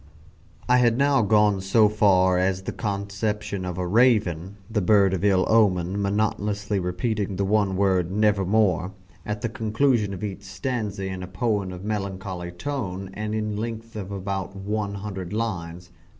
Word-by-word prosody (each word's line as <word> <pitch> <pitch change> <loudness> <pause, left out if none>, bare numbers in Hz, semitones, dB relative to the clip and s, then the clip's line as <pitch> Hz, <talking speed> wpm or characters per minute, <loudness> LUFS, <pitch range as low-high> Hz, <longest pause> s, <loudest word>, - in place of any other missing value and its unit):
I 125 0 +5
had 120 -1 +3
now 140 -1 +3
gone 105 -2 +3
so 105 +3 +4
far 95 -3 +3
as 95 0 0
the - - -3
conception 100 -1 -3
of 90 -1 -4
a 90 - -1
Raven, 100 -4 +2
the 110 -2 -1
bird 100 0 +4
of 95 0 -2
ill 95 -2 +3
omen, 100 -3 +2
monotonously 105 0 -1
repeating 95 +3 -2
the 100 +1 0
one 100 -1 +2
word 95 -3 +2
"Nevermore" 100 -2 +2 0.3
at 105 0 -3
the 115 - -1
conclusion 110 -1 +1
of 95 +1 -6
each 100 -1 -4
stanza 100 +1 -4
in 95 -1 -4
a 90 - -6
poem 100 0 -1
of 90 0 -8
melancholy 95 -4 -4
tone, 95 -3 -4
and 105 +1 -3
in 105 -1 -2
length 115 +1 -5
about 100 -1 -4
one 100 +1 -3
hundred 95 -2 -6
lines. 90 -6 -4
100 Hz, 155 wpm, -24 LUFS, 95-110 Hz, 0.3 s, I